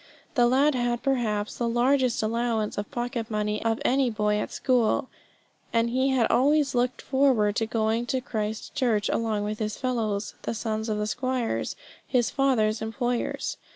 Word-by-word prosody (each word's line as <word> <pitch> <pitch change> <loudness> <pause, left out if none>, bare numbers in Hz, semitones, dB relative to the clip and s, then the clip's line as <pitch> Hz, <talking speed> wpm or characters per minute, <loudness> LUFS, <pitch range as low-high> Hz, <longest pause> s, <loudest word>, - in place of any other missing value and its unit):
The 245 -5 +4
lad 275 +4 +4
had, 240 -1 -1
perhaps, 225 -6 -1
the 235 -1 +1
largest 250 0 +2
allowance 225 -1 0
of 205 0 -4
pocket 240 -1 -3
money 210 -1 -1
of 225 0 +1
any 265 0 +3
boy 210 -1 0
at - - -3
school; 255 0 +1 0.6
and 230 0 +1
he 260 +2 +2
had 260 -3 +3
always 290 +2 +3
looked 245 0 0
forward 260 -7 +2
to 225 - 0
going 225 +1 0
to 260 - 0
Christ 220 -4 -4
Church 220 -5 +1
along 220 -2 0
with 210 +1 -3
his 215 -1 -2
fellows, 220 -5 -2
the - - -3
sons 220 0 -2
of 215 - 0
the 210 - -1
squires, 250 +1 -2 0.3
his 245 -3 +1
father's 235 -6 +2
employers. 240 +2 -2
235 Hz, 165 wpm, -26 LUFS, 215-255 Hz, 0.6 s, The